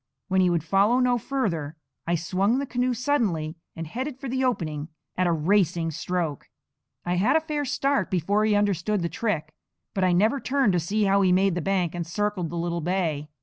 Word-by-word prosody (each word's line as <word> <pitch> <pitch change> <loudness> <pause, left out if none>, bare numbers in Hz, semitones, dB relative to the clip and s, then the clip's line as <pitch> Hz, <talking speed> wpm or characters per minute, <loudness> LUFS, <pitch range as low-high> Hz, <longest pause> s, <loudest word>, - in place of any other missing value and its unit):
When 190 0 +3
he 180 - +4
would 170 -3 0
follow 200 +8 +3
no 250 -1 +2
further, 170 - -2 0.3
I 170 - +2
swung 190 +7 +1
the 280 - -1
canoe 250 -1 0
suddenly, 210 - 0 0.2
and 165 - -5
headed 255 - -5
for 275 - -6
the 260 +1 -1
opening 155 - -1 0.3
at 185 0 +1
a - - +2
racing 170 0 +1
stroke. 165 -1 -3 0.6
I 175 0 0
had 215 - +3
a - - +6
fair 305 -2 -3
start 275 +2 0
before 195 +3 +1
he 215 -1 +3
understood 205 0 +1
the 170 - -1
trick; 165 -9 -2 0.4
but 190 - 0
I 185 - +4
never 215 +10 +3
turned 265 -6 +1
to 175 - +2
see 205 +6 0
how 200 0 +3
he 185 -2 +3
made 190 +1 +3
the 175 - -2
bank 185 -2 0
and 175 -1 -3
circled 205 -2 -1
the 170 - -5
little 170 0 -2
bay. 160 -4 -1
190 Hz, 205 wpm, -25 LUFS, 170-230 Hz, 0.6 s, a